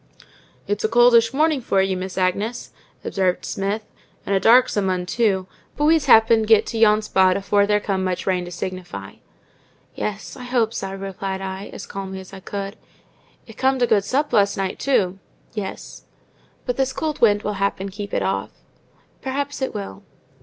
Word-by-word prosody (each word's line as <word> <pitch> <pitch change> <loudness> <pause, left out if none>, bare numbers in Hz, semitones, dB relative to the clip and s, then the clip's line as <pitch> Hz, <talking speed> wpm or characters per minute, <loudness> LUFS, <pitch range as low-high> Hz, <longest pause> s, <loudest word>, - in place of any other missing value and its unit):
"It's 205 0 -2
a - - +3
coldish 235 -1 +5
mornin' 305 0 +2
for 195 -4 +1
you, 190 0 +1
Miss 185 0 -5
Agnes," 200 +6 -1 0.3
observed 185 -2 0
Smith; 200 +2 -2 0.4
"and 200 - -1
a - - +3
darksome 225 -3 +4
'un 180 -1 -1
too; 195 -2 +1 0.3
but 295 - +1
we's 315 -2 +4
happen 225 -3 +6
get 220 -1 +4
to 225 - -4
yon 215 -1 +5
spot 190 -3 +3
afore 200 +1 +2
there 210 0 +3
come 195 -2 -2
much 185 -1 -2
rain 185 -2 0
to 175 - -9
signify." 175 - -6 0.8
"Yes, 210 0 -5
I 250 - -9
hope 240 -3 +1
so," 195 -3 -4
replied 195 0 -5
I, 190 +1 -5
as - - -8
calmly 190 -1 -6
as 190 +1 -12
I 195 - -8
could. 195 +1 -6 0.7
"It's 225 - -14
comed 265 -1 +2
a - - +6
good 205 -3 +3
sup 275 +6 -1
last 200 -2 +3
night 195 -1 -3
too." 195 -9 +1 0.3
"Yes." 205 -4 -7 0.6
"But 250 -1 -2
this 265 -1 0
cold 310 +1 -3
wind 205 -3 +4
will 210 - -2
happen 200 0 -1
keep 200 +1 -7
it - - 0
off." - - -1 0.7
"Perhaps 280 +1 -3
it 265 - -2
will." 95 -1 -6
205 Hz, 180 wpm, -22 LUFS, 190-235 Hz, 0.8 s, happen